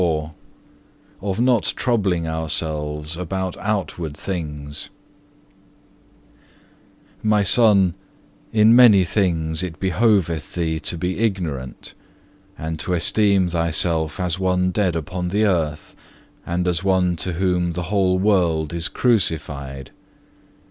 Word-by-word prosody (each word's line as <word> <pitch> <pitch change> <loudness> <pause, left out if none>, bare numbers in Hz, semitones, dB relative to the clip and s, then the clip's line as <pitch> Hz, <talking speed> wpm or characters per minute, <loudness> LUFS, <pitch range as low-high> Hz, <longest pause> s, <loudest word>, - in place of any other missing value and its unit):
CHAPTER 85 -3 +2
XLIV 75 +1 -6 1.0
Of 95 +2 -2
not 120 -2 +3
troubling 95 -9 0
ourselves 75 -1 -2
about 95 +1 -4
outward 90 -7 -3
things 75 -6 -5 2.3
"My 105 -1 +2
Son, 100 -4 +5 0.6
in 110 +1 +5
many 115 -6 +7
things 85 -4 0
it 90 -2 -5
behoveth 95 -5 +1
thee 80 -2 -1
to 85 - -3
be 90 +3 -3
ignorant, 85 - -3 0.6
and 80 0 -5
to 90 - -1
esteem 95 +1 +3
thyself 85 -1 0
as 90 -1 -1
one 90 -1 +1
dead 90 -3 0
upon 90 +2 -4
the 100 +4 0
earth, 80 -6 -1 0.5
and 90 +1 -1
as 90 0 0
one 95 -2 +2
to 90 +2 +2
whom 90 -1 0
the 90 +1 -4
whole 95 -2 +2
world 85 -6 +1
is 85 +2 -1
crucified. 75 - -1
90 Hz, 115 wpm, -21 LUFS, 80-95 Hz, 2.3 s, many